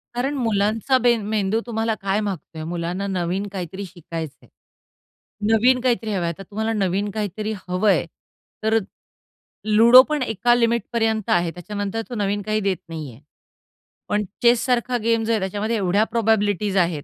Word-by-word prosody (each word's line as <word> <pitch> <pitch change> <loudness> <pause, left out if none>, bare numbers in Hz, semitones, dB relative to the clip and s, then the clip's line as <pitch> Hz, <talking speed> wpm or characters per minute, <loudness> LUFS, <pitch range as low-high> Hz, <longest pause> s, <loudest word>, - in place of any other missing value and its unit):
कारण 270 +4 -1
मुलांचा 225 +2 +1
बेन 235 -2 +4
मेंदू 215 0 +1
तुम्हाला 225 -1 -1
काय 195 +1 0
मागतोय, 170 -5 -5
मुलांना 175 +4 -3
नवीन 185 +1 -2
काहीतरी 190 +1 -5
शिकायचंय, 165 -4 -8 1.0
नवीन 250 +3 +4
काहीतरी 235 -3 0
हवंय. 175 -3 0
आता 180 +4 -7
तुम्हाला 220 +4 -3
नवीन 200 0 0
काहीतरी 215 +1 -3
हवंय 180 -1 +2 0.6
तर 220 +1 +3 0.9
लुडो 230 +4 +8
पण 300 -2 0
एका 240 +2 +2
लिमिटपर्यंत 230 -2 0
आहे 175 -1 +2
त्याच्यानंतर 205 +4 -4
तो 245 - -5
नवीन 205 -1 -1
काही 215 +2 -1
देत 195 -3 0
नाहीये. 150 -8 -7 0.9
पण 210 0 +1 0.2
चेससारखा 245 +1 +3
गेम 230 0 +2
जो 230 - 0
आहे 220 - +2
त्याच्यामध्ये 205 +4 -2
एवढ्या 195 +2 +2
प्रोबॅबिलिटीज 210 -3 +1
आहेत, 170 -5 +1
210 Hz, 140 wpm, -22 LUFS, 190-225 Hz, 1.0 s, लुडो